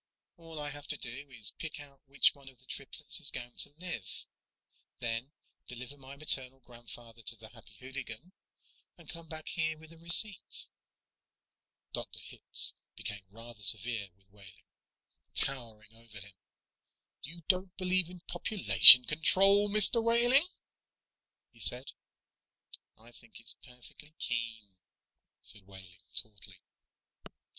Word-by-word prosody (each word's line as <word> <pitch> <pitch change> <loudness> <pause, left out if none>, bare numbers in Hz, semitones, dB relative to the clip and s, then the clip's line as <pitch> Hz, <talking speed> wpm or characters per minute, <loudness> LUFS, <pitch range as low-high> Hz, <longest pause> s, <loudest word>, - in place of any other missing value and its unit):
"All 165 -2 -10
I 145 -1 -6
have 145 +1 -11
to 145 - +3
do 130 +4 -7
is 115 -5 0
pick 160 -1 -7
out 140 -2 -14
which 140 +1 +3
one 140 -2 -15
of 130 - -18
the - - -20
triplets - - -3
is - - -1
going 120 0 -7
to - - 0
live, 165 - -7 0.7
then 120 +3 -5 0.4
deliver 125 +3 -9
my 135 0 -13
maternal 135 -3 +1
grandfather 120 -1 -13
to 115 - 0
the 110 0 -15
Happy 115 -2 -16
Hooligan, 130 +3 -8 0.7
and - - -17
come 165 -1 -8
back 155 0 -8
here 160 -1 -3
with 160 +1 -16
a 165 - -19
receipt." 175 +4 0 1.2
Dr. - - -4
Hitz - - -3 0.2
became 105 -2 -7
rather 115 +1 -11
severe 105 0 +2
with 95 0 -30
Wehling, 100 -2 -15 0.7
towered 115 -5 -4
over 115 -2 -12
him. 100 +1 -11 0.9
"You 170 +3 -10
don't 185 0 -1
believe 185 -2 +1
in 180 -1 -13
population 180 - +8
control, 195 +6 +4
Mr. 215 +3 +5
Wehling?" 240 +7 +3 1.0
he - - -23
said. 125 +2 +5 1.1
"I 115 +2 -13
think 115 -2 -13
it's 115 - +2
perfectly 130 +4 -14
keen," 110 -5 -5 0.7
said 100 -3 -10
Wehling 95 -2 -15
tautly. 100 -4 -3
130 Hz, 135 wpm, -30 LUFS, 115-160 Hz, 1.2 s, population